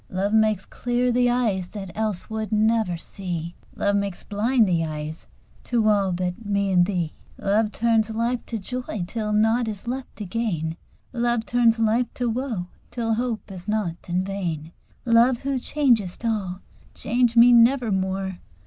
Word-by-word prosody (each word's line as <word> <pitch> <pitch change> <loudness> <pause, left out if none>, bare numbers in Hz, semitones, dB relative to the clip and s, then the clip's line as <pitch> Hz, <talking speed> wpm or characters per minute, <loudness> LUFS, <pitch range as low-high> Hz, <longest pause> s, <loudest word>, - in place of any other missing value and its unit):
Love 195 +3 -1
makes 215 -3 +3
clear 245 0 0
the 245 0 +3
eyes 220 -7 +1
that 195 -2 -7
else 215 -4 -2
would 220 0 -4
never 215 -4 +2
see: 170 -2 -5 0.2
"Love 200 0 +1
makes 200 -2 -2
blind 220 +2 +2
the 170 -3 +1
eyes 155 0 -5 0.4
to 230 -3 +1
all 200 -3 +3
but 180 +4 -3
me 200 -1 0
and 180 -1 +4
thee." 175 -6 -1 0.2
Love 210 +2 +1
turns 225 -1 +2
life 235 +2 -1
to 230 - -3
joy 220 -2 -4
till 215 +2 -3
nought 225 +3 +3
is 210 +1 -6
left 260 +2 -4
to 210 - -6
gain: 175 -6 -2 0.4
"Love 240 -2 0
turns 235 0 +3
life 225 +2 +1
to 245 - -1
woe 230 -5 -2 0.2
till 230 -2 -1
hope 230 -3 -2
is 185 0 -9
nought 205 -6 -2
and 180 +2 0
vain." 170 -5 -4 0.3
Love, 235 +2 +5
who 275 -1 -1
changest 240 -8 +1
all, 200 -5 -2 0.3
change 240 +1 +1
me 240 +1 +8
nevermore! 195 -7 +2
215 Hz, 160 wpm, -24 LUFS, 190-235 Hz, 0.4 s, me